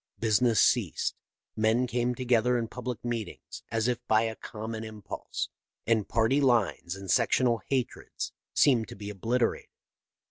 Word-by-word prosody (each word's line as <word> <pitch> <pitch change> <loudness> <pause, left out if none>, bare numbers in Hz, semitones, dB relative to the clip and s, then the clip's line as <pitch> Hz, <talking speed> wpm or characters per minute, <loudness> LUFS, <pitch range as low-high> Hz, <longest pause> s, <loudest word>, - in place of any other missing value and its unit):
Business 115 0 +3
ceased. - - +2 0.4
Men 110 +3 +2
came 125 0 0
together 125 0 +2
in 115 -1 -1
public 125 -1 -5
meetings 115 -5 -5
as 115 0 +1
if 125 -2 0
by 110 +1 +4
a 110 -1 -2
common 110 0 -6
impulse, 110 -2 -5 0.4
and 110 -3 +1
party 115 +5 +3
lines 115 -8 +2
and 100 -1 -4
sectional 120 -1 +3
hatreds 130 -3 -2 0.2
seemed 120 -6 +4
to - - -9
be 105 +1 -6
obliterated. 115 +4 0
115 Hz, 140 wpm, -29 LUFS, 110-125 Hz, 0.4 s, by